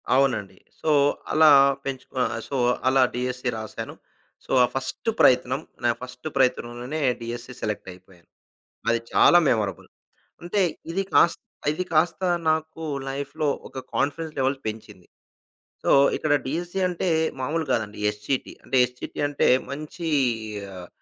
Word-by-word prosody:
అవునండి. 110 Hz, -8 st, +1 dB, 0.2 s
సో, 155 Hz, -, +1 dB, 0.4 s
అలా 155 Hz, 0 st, +6 dB, 0.4 s
పెంచుకు 135 Hz, -1 st, -6 dB
ఆహ్, 110 Hz, -, -1 dB
సో 140 Hz, -, -2 dB, 0.3 s
అలా 135 Hz, 0 st, +4 dB
డీఎస్సీ 125 Hz, +1 st, -2 dB
రాసాను. 110 Hz, -1 st, -6 dB, 0.5 s
సో, -, -, -9 dB
ఆ -, -, +4 dB
ఫస్టు 135 Hz, -, -3 dB
ప్రయత్నం, 130 Hz, +2 st, +4 dB, 0.2 s
నా 120 Hz, -, +3 dB
ఫస్టు 125 Hz, +3 st, -8 dB
ప్రయత్నంలోనే, 125 Hz, +2 st, 0 dB, 0.2 s
డీఎస్సీ 120 Hz, +2 st, -6 dB
సెలెక్ట్‌యిపోయాను. 95 Hz, -4 st, -7 dB, 0.6 s
అది 115 Hz, 0 st, +2 dB
చాలా 175 Hz, -, +6 dB
మెమరబుల్. 105 Hz, -6 st, -1 dB, 0.6 s
అంటే 175 Hz, +4 st, -1 dB, 0.3 s
ఇది 195 Hz, +3 st, 0 dB
కాస్ 170 Hz, -, +5 dB, 0.3 s
ఇది 155 Hz, +5 st, -2 dB
కాస్త 165 Hz, +3 st, +2 dB, 0.3 s
నాకు 160 Hz, +1 st, -2 dB, 0.3 s
లైఫ్‌లో 140 Hz, +3 st, -3 dB, 0.2 s
ఒక -, -, -9 dB, 0.2 s
కాన్ఫిడెన్స్ 155 Hz, +3 st, -1 dB
లెవెల్ 135 Hz, +1 st, +1 dB
పెంచింది. 105 Hz, -4 st, -7 dB, 0.8 s
సో, -, -, 0 dB, 0.3 s
ఇక్కడ 155 Hz, -, 0 dB
డీఎస్సీ 175 Hz, +6 st, -3 dB
అంటే, 180 Hz, +1 st, -2 dB, 0.3 s
మాములు 160 Hz, +5 st, -1 dB
కాదండి 110 Hz, -4 st, -1 dB
ఎస్‌సిటి. 105 Hz, +6 st, -3 dB
అంటే, -, -, -1 dB
ఎస్‌సిటి 125 Hz, 0 st, -8 dB
అంటే 145 Hz, -, +1 dB, 0.2 s
మంచీ 155 Hz, +4 st, -5 dB, 0.7 s
ఆహ్, 90 Hz, -1 st, -9 dB
130 Hz, 125 wpm, -25 LUFS, 115-155 Hz, 0.8 s, అలా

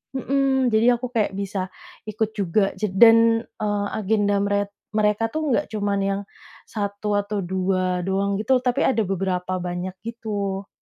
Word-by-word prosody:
Mhm, 265 Hz, -1 st, +1 dB
jadi 230 Hz, +3 st, +4 dB
aku 245 Hz, +1 st, -6 dB
kayak 215 Hz, -5 st, 0 dB
bisa, 195 Hz, -1 st, -3 dB, 0.4 s
ikut 215 Hz, 0 st, -1 dB
juga 200 Hz, -1 st, +1 dB
dan, 225 Hz, +3 st, +5 dB
eee, 205 Hz, -3 st, -3 dB
agenda 205 Hz, -1 st, +1 dB
meret 200 Hz, 0 st, 0 dB, 0.2 s
mereka 210 Hz, +1 st, +2 dB
tuh 305 Hz, +4 st, -2 dB
nggak 230 Hz, -, +1 dB
cuma 205 Hz, -2 st, -1 dB
yang 195 Hz, 0 st, -1 dB, 0.4 s
1 205 Hz, 0 st, -4 dB
atau 205 Hz, 0 st, -3 dB
2 185 Hz, 0 st, 0 dB
doang 195 Hz, +1 st, 0 dB
gitu, 260 Hz, +5 st, +2 dB
tapi 250 Hz, -1 st, +2 dB
ada 230 Hz, -4 st, +2 dB
beberapa 185 Hz, -1 st, -2 dB
banyak 180 Hz, +1 st, -4 dB
gitu. 205 Hz, -4 st, -4 dB
205 Hz, 145 wpm, -23 LUFS, 195-225 Hz, 0.4 s, dan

